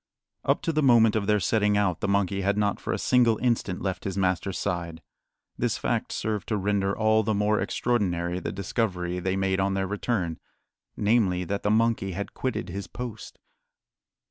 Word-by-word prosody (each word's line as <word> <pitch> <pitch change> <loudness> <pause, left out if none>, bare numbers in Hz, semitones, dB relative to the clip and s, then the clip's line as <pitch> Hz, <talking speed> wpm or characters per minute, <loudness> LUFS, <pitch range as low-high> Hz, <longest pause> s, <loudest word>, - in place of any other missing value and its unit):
Up - - +1
to 165 - 0
the 155 - +2
moment 115 -5 +5
of 105 -2 0
their 105 -1 +3
setting 105 0 +2
out 95 -5 +1
the 100 - -1
monkey 100 -1 +1
had 100 +1 +1
not 105 -1 +1
for - - -4
a - - 0
single 120 -3 +3
instant 115 -7 -1
left 95 -1 -2
his 95 -1 -4
master's 95 0 0
side. 85 -2 -3 0.6
This - - 0
fact - - -1
served 105 -3 -2
to 110 - 0
render 100 0 0
all 110 0 +3
the 110 0 0
more 105 +1 +2
extraordinary 90 -7 0
the - - -4
discovery 90 -2 -2
they 95 +1 -1
made 95 0 0
on 95 0 +1
their 95 0 0
return 95 -4 -2 0.6
namely, 100 -4 +2
that 100 +3 -3
the 105 - 0
monkey 110 -3 +1
had 100 +3 -5
quitted 130 -7 -3
his 95 +1 -5
post. 120 +1 -7
100 Hz, 185 wpm, -26 LUFS, 95-110 Hz, 0.6 s, moment